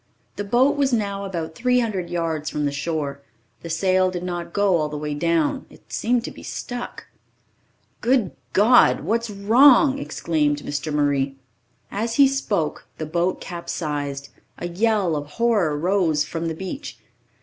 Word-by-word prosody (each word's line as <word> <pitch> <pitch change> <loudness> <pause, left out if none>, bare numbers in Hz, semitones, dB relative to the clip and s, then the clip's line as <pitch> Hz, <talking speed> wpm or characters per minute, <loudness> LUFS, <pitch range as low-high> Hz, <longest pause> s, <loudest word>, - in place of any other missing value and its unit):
The 205 - -3
boat 255 +8 +3
was 275 -2 +2
now 200 -4 -1
about 165 -4 -4
300 230 -6 0
yards 165 -3 -2
from 150 -1 -2
the 145 - 0
shore. 140 -1 -3 0.4
The 170 - -8
sail 185 +2 +2
did 180 -1 -5
not 175 -1 -4
go 200 -2 +3
all 155 -2 -1
the 150 - -5
way 150 0 -3
down 165 +1 0
it - - -17
seemed 240 +1 +1
to - - -5
be - - -12
stuck. 245 0 -6 1.0
"Good 240 -6 +2 0.2
God, 230 - +5
what's 230 +7 -1
wrong?" 255 +8 +5
exclaimed 150 - -1
Mr. 145 +1 -3
Murray. 140 -2 +1 0.6
As 225 +3 -2
he 280 -1 +7
spoke, 220 - -2
the 155 - -4
boat 170 +4 0
capsized. 145 -5 -4 0.3
A 175 - -4
yell 200 -2 +1
of 145 0 -5
horror 210 -11 +2
rose 165 -3 +1
I - - -13
from 165 0 -3
the 160 - -3
beach. 190 - -6
175 Hz, 160 wpm, -23 LUFS, 155-225 Hz, 1.0 s, he